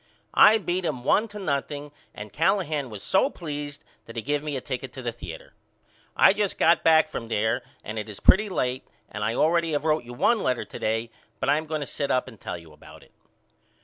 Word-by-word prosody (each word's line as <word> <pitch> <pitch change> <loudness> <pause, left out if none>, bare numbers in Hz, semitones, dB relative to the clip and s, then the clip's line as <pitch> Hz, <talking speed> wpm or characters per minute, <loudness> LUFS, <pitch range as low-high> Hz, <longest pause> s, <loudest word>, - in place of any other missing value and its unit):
I 220 +1 +7
beat 185 -2 -2
him 145 -7 -2
one 215 - +3
to 210 -1 -10
nothing 145 -4 -3 0.2
and 105 0 -9
Callahan 155 -5 +1
was 105 -3 -8
so 195 +8 +3
pleased 145 - -6 0.2
that 115 - -11
he 115 - -3
give 145 +3 0
me 150 -2 -3
a - - -2
ticket 130 -1 -5
to 130 - -8
the 120 - -1
theater. 115 - -10 0.6
I - - +7
just 205 -1 -1
got 170 0 +4
back 160 -1 +5
from 115 -6 -6
there 110 +2 0 0.2
and 110 +1 -5
it 110 - -6
is 105 - -8
pretty 210 +2 +5
late 130 -8 -2 0.2
and 105 - -4
I 110 +2 0
already 165 +2 +2
have 145 +1 -1
wrote 155 -3 +2
you 120 0 -10
one 230 - +2
letter 125 -2 0
to - - -9
day 115 +1 -1 0.3
but - - -1
I 145 - +4
am 155 - -8
going 155 -1 -2
to - - -2
sit 140 +1 -3
up 130 - +1
and 115 -5 -13
tell - - -5
you 80 -2 -14
about - - -15
it. - - -23
145 Hz, 230 wpm, -25 LUFS, 120-165 Hz, 0.6 s, I